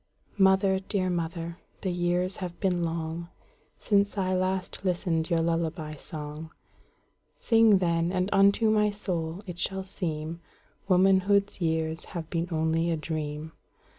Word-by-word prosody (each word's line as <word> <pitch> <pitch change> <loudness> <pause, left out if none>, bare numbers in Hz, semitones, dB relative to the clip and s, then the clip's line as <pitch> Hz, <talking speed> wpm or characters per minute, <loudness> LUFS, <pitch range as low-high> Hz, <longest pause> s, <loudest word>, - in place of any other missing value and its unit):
Mother, 190 0 +4
dear 190 -1 -1
mother, 170 0 -3 0.2
the 190 - -1
years 175 +1 0
have 175 -2 -6
been 180 -3 +1
longSince 170 +5 -2
I 185 -1 +1
last 185 0 -1
listened 175 -3 0
your 170 -2 +2
lullaby 165 -2 -1
song:Sing, 160 - -1
then, 170 -1 +1
and 185 0 0
unto 200 +3 +4
my 210 -1 +3
soul 180 -3 -3
it 175 -3 -7
shall 190 +2 -1
seemWomanhood's 185 +4 0
years 160 -1 -1
have 160 -2 -5
been 170 0 -1
only 160 +1 +1
a 165 - 0
dream. 155 0 -4
175 Hz, 120 wpm, -28 LUFS, 165-190 Hz, 0.2 s, Mother